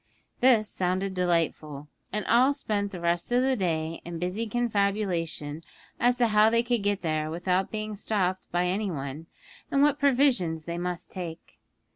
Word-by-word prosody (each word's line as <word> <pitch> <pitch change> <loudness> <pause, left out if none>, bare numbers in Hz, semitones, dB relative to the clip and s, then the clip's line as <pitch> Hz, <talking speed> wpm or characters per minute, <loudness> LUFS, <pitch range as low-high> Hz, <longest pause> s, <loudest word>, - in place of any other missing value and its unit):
This 240 -4 +5
sounded 185 +1 -1
delightful, 165 -5 -1 0.2
and 210 -1 -2
all 260 +4 +4
spent 205 -7 -2
the 180 - -6
rest 170 +4 0
of 245 +1 +3
the 265 0 +2
day 165 -5 -2
in 170 0 -6
busy 180 +7 -2
confabulation 200 -9 -1 0.4
as 245 +1 +3
to 240 -2 +3
how 215 +1 +5
they 230 +1 +2
could 240 -2 0
get 205 -1 -1
there 155 -1 -1
without 180 +3 0
being 215 -1 -4
stopped 190 -3 -1
by 175 +1 +1
any 195 +3 -1
one, 145 0 -5 0.4
and 280 0 +3
what 295 0 +3
provisions 245 - +2
they 170 0 -4
must 180 0 -4
take. 170 -4 -8
190 Hz, 165 wpm, -27 LUFS, 170-225 Hz, 0.4 s, This